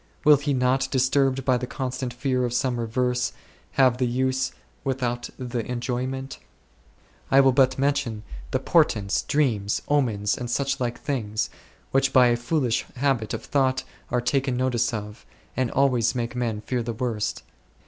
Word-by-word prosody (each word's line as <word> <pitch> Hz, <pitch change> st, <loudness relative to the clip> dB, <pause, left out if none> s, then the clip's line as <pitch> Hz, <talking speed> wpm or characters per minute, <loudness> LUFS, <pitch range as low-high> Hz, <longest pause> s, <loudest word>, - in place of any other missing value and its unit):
Will 150 Hz, -1 st, +8 dB
he 145 Hz, +1 st, -2 dB
not, 130 Hz, 0 st, +2 dB
disturbed 135 Hz, 0 st, +2 dB
by 130 Hz, -2 st, +3 dB
the 125 Hz, 0 st, -4 dB
constant 130 Hz, -1 st, -3 dB
fear 125 Hz, +1 st, -1 dB
of 120 Hz, -1 st, -1 dB
some 125 Hz, -1 st, 0 dB
reverse, 125 Hz, +1 st, 0 dB, 0.4 s
have 130 Hz, -2 st, +4 dB
the 125 Hz, -, +2 dB
use 130 Hz, +2 st, 0 dB, 0.3 s
without 125 Hz, -3 st, -2 dB
the 125 Hz, -2 st, -3 dB
enjoyment? 130 Hz, +2 st, -3 dB, 0.9 s
I 135 Hz, -, +6 dB
will 135 Hz, -1 st, +6 dB
but 130 Hz, 0 st, +3 dB
Mention 135 Hz, -6 st, 0 dB, 0.3 s
the -, -, +1 dB
portents, 100 Hz, -1 st, +2 dB
dreams, 115 Hz, -9 st, 0 dB
omens, 115 Hz, -8 st, +1 dB
and 120 Hz, -1 st, -5 dB
such 140 Hz, +2 st, 0 dB
like 120 Hz, -1 st, -2 dB
things 110 Hz, -7 st, -2 dB, 0.4 s
which 135 Hz, 0 st, +2 dB
by 125 Hz, -2 st, +6 dB
a 120 Hz, -, +3 dB
foolish 120 Hz, 0 st, 0 dB
habit 125 Hz, -5 st, 0 dB
of -, -, -7 dB
thought 130 Hz, -2 st, +1 dB, 0.3 s
are 125 Hz, 0 st, +1 dB
taken 130 Hz, 0 st, 0 dB
notice 125 Hz, -2 st, +1 dB
of, 105 Hz, -1 st, -6 dB, 0.3 s
and 130 Hz, -2 st, 0 dB
always 125 Hz, -3 st, +2 dB
make 120 Hz, -1 st, -3 dB
men 115 Hz, -4 st, -2 dB
fear 125 Hz, +2 st, -2 dB
the 115 Hz, 0 st, -3 dB
worst. 115 Hz, -3 st, -2 dB
125 Hz, 160 wpm, -25 LUFS, 120-135 Hz, 0.9 s, Will